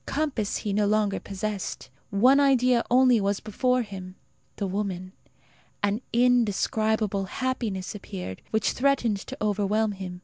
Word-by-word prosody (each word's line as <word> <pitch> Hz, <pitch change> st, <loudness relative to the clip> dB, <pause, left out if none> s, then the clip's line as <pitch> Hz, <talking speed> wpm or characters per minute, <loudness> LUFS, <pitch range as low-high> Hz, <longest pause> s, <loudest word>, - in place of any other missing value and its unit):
Compass 275 Hz, -8 st, -1 dB
he 205 Hz, -, -3 dB
no 205 Hz, 0 st, +2 dB
longer 210 Hz, -1 st, +1 dB
possessed. 200 Hz, -7 st, -5 dB, 0.2 s
One 250 Hz, +8 st, +5 dB
idea 255 Hz, -3 st, +4 dB
only 250 Hz, -2 st, +5 dB
was 200 Hz, 0 st, 0 dB
before 250 Hz, +4 st, 0 dB
him 185 Hz, -3 st, -9 dB, 0.4 s
the 200 Hz, -, -3 dB
woman. 190 Hz, -1 st, -3 dB, 0.7 s
An 205 Hz, +3 st, +1 dB
indescribable 220 Hz, -4 st, +2 dB
happiness 220 Hz, -5 st, -3 dB
appeared, 190 Hz, -, -7 dB
which 220 Hz, -1 st, +1 dB
threatened 250 Hz, -5 st, +1 dB
to -, -, -8 dB
overwhelm 210 Hz, +1 st, +1 dB
him. 185 Hz, -2 st, -7 dB
210 Hz, 130 wpm, -26 LUFS, 195-245 Hz, 0.7 s, One